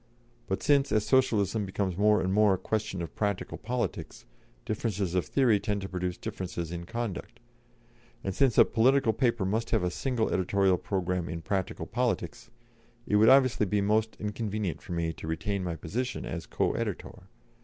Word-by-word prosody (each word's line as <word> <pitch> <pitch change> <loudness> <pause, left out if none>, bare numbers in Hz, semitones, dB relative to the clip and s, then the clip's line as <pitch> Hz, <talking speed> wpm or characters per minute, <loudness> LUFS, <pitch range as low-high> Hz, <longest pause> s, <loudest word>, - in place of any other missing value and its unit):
But 95 - -2
since, 140 -1 +3
as 110 -1 +2
Socialism 110 -5 +2
becomes 95 -1 -2
more 105 +2 +4
and 95 +1 0
more 105 -1 +5
a - - -5
question 105 -3 -2
of 80 - -7
practical 100 -3 -2
politics, 125 - -4 0.4
differences 100 -4 -2
of 90 -1 0
theory 120 -7 +3
tend 100 0 -2
to 95 - -5
produce 90 -1 -3
differences 85 -3 -5
in 85 0 -6
conduct; 115 0 -5 0.8
and 95 - -2
since 130 +1 +2
a - - +8
political 125 0 +3
paper 120 -6 +1
must 110 +4 -1
have - - +1
a 90 - 0
single 125 +2 -1
editorial 95 0 +2
programme 90 -3 -2
in 85 0 -5
practical 95 -3 -2
politics, - - -2 0.6
it 105 - +2
would 110 +2 +6
obviously 130 -6 +5
be 105 +2 +1
most 110 +2 +1
inconvenient 105 -3 -3
for 95 - -7
me 85 -1 -1
to 80 - -9
retain 95 +5 -2
my 85 -2 -3
position 125 - -3
as - - -5
co - - 0
editor. 95 0 -5
100 Hz, 175 wpm, -29 LUFS, 90-110 Hz, 0.8 s, a